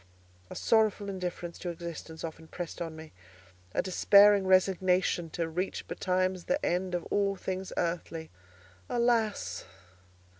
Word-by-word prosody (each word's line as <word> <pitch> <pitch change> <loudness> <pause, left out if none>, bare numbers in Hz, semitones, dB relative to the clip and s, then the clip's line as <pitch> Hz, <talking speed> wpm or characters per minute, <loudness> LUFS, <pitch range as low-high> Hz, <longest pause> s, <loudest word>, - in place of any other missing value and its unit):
A - - -8
sorrowful 215 -2 +2
indifference 180 -2 -5
to 180 - -4
existence 165 -1 -7
often 160 0 -7
pressed 175 0 -6
on 165 -2 -4
me—a 90 - -8
despairing 200 +1 +6
resignation 185 -2 +3
to 165 +1 -2
reach 180 +4 -3
betimes 185 -1 -1
the 280 +2 0
end 180 +1 0
of 175 - -3
all 200 -1 +2
things 190 0 -4
earthly. 165 -1 -2 0.6
Alas! 235 -3 +1
180 Hz, 120 wpm, -30 LUFS, 165-195 Hz, 0.6 s, despairing